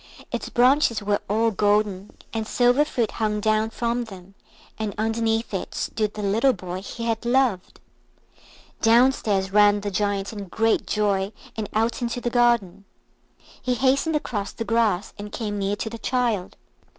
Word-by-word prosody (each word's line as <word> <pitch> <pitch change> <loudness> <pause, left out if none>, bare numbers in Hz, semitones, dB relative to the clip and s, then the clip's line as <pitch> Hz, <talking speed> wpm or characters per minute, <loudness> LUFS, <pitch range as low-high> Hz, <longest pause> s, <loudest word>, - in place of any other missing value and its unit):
Its - - -4
branches 250 -2 +3
were 205 0 +1
all 225 +2 +2
golden, 205 -1 +1 0.2
and 220 -1 -2
silver 245 +5 +3
fruit 245 -7 -1
hung 215 -2 -1
down 215 +1 +1
from 235 +1 -2
them, 195 -3 -12 0.5
and 215 -2 -3
underneath 225 0 0
it 190 - -4
stood 215 -2 -2
the 210 - -4
little 225 +7 +3
boy 185 -2 -6
he 230 +4 -7
had 230 0 -1
loved. 240 -6 +1 1.0
Downstairs 225 -5 +3
ran 205 0 +5
the 205 0 -3
Giant 200 +1 -1
in 205 -2 -6
great 225 +4 0
joy, 200 -2 0 0.2
and 215 -2 -4
out 225 +3 0
into 240 0 -2
the 240 0 -2
garden. 235 -6 +2 0.8
He 250 -1 0
hastened 275 +6 +2
across 210 -9 -2
the 230 - -5
grass, 225 -5 +1
and 205 0 -7
came 210 -3 -3
near 200 +1 0
to 215 - -4
the 230 - -7
child. 235 -8 -1
220 Hz, 160 wpm, -24 LUFS, 205-235 Hz, 1.0 s, ran